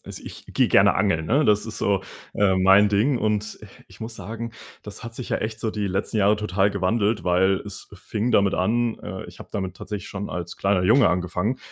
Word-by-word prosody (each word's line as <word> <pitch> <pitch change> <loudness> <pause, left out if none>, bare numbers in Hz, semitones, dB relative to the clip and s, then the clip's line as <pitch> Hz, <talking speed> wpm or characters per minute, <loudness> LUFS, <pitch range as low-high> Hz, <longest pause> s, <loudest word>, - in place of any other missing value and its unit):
also - - -8
ich - - -9
gehe - - +1
gerne - - +5
angeln, 80 -1 +1
ne, 145 - +3
das 105 -3 +2
ist 110 - -7
so 100 -2 +1 0.3
äh, 100 -2 +3
mein 95 +2 +5
Ding 110 +6 +2
und 105 -1 -1 0.3
ich - - -16
muss 115 0 -7
sagen, 115 +3 -6 0.3
das 105 +3 -9
hat 115 0 -8
sich 125 - -7
ja - - +1
echt 110 0 -4
so 110 0 -2
die 105 -2 -2
letzten 100 +3 -2
Jahre 105 +2 +4
total 100 -1 +1
gewandelt, 105 +3 0
weil 95 +2 +3
es 100 -1 -8
fing 105 +4 -3
damit 100 -4 +3
an, 115 +5 +1
äh, - - -7
ich - - -13
habe - - -10
damit 95 -2 -4
tatsächlich 105 -2 -6
schon 100 +1 -5
als 85 -1 -5
kleiner 100 -2 +1
Junge 115 +7 +5
angefangen, 90 +7 -1
105 Hz, 215 wpm, -23 LUFS, 95-110 Hz, 0.3 s, gerne